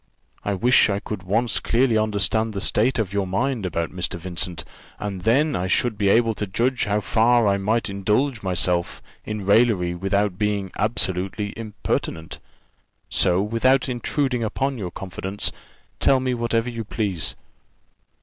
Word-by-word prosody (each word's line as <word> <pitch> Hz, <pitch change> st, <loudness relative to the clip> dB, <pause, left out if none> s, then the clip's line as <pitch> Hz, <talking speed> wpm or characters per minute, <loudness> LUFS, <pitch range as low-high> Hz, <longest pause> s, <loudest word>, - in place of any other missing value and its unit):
I 100 Hz, -, -1 dB
wish 120 Hz, +3 st, +4 dB
I 100 Hz, 0 st, 0 dB
could 105 Hz, -1 st, -6 dB
once 110 Hz, +6 st, 0 dB
clearly 120 Hz, 0 st, +2 dB
understand 110 Hz, +1 st, +1 dB
the 100 Hz, -, -3 dB
state 120 Hz, +6 st, +2 dB
of 105 Hz, -4 st, -1 dB
your 100 Hz, -1 st, 0 dB
mind 115 Hz, +2 st, -1 dB
about 85 Hz, -1 st, -2 dB
Mr. 90 Hz, +2 st, -3 dB
Vincent, 90 Hz, 0 st, -4 dB, 0.3 s
and 100 Hz, -3 st, -5 dB
then 140 Hz, -, +2 dB
I 90 Hz, +1 st, -1 dB
should 115 Hz, +4 st, +1 dB
be 100 Hz, -1 st, +1 dB
able 115 Hz, +2 st, +4 dB
to 105 Hz, -, -1 dB
judge 120 Hz, +6 st, 0 dB
how 105 Hz, 0 st, 0 dB
far 115 Hz, +1 st, +3 dB
I 100 Hz, 0 st, +3 dB
might 110 Hz, +4 st, 0 dB
indulge 110 Hz, +6 st, 0 dB
myself 90 Hz, -2 st, -1 dB, 0.2 s
in 105 Hz, -2 st, -4 dB
raillery 100 Hz, -4 st, +3 dB
without 95 Hz, +1 st, 0 dB
being 105 Hz, -3 st, -1 dB
absolutely 100 Hz, -1 st, -1 dB
impertinent. 105 Hz, -7 st, -4 dB, 0.7 s
So 90 Hz, +2 st, +3 dB
without 125 Hz, +5 st, +2 dB
intruding 125 Hz, 0 st, -1 dB
upon 130 Hz, +4 st, -1 dB
your 95 Hz, -4 st, -3 dB
confidence, 95 Hz, +2 st, -3 dB, 0.5 s
tell 135 Hz, -, +4 dB
me 130 Hz, -1 st, -1 dB
whatever 115 Hz, -1 st, 0 dB
you 115 Hz, -1 st, -4 dB
please." 100 Hz, -6 st, -2 dB
105 Hz, 150 wpm, -23 LUFS, 95-115 Hz, 0.7 s, wish